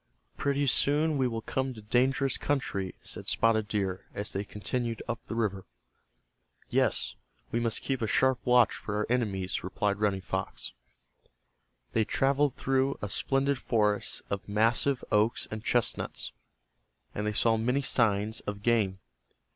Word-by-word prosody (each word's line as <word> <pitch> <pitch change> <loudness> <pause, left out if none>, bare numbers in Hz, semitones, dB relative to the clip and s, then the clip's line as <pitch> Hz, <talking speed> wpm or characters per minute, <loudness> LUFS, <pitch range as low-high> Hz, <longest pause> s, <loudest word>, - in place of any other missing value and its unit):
"Pretty 140 0 0
soon 150 +4 +3
we 130 -2 +2
will 115 -2 -4
come 130 +1 -2
to 110 - -10
dangerous 130 +4 +2
country," 100 -10 -2
said - - -5
Spotted 110 -2 +2
Deer, 95 -3 -2
as 100 +1 -3
they 100 - -1
continued 115 +3 -3
up 120 -2 -4
the - - -4
river. 100 -5 -1 1.0
"Yes, - - +2 0.4
we 120 - +1
must 115 -1 0
keep 135 -2 -1
a 110 - 0
sharp 130 +5 +3
watch 125 -2 +5
for 105 - -5
our 105 - 0
enemies," 100 -7 0
replied 100 +2 -1
Running 100 -2 +1
Fox. 95 0 -4 1.2
They 115 - +3
traveled 140 +4 +1
through 135 +1 +1
a 105 - -4
splendid 135 +5 +1
forest 105 -4 0
of 100 0 -3
massive 115 +5 +2
oaks 110 +3 +2
and 110 0 -5
chestnuts, 120 -1 0 0.8
and 105 +1 -2
they 105 - 0
saw 115 +2 +3
many 125 +5 0
signs 110 -3 +2
of 100 0 -6
game. 110 -5 +2
115 Hz, 145 wpm, -29 LUFS, 105-130 Hz, 1.2 s, watch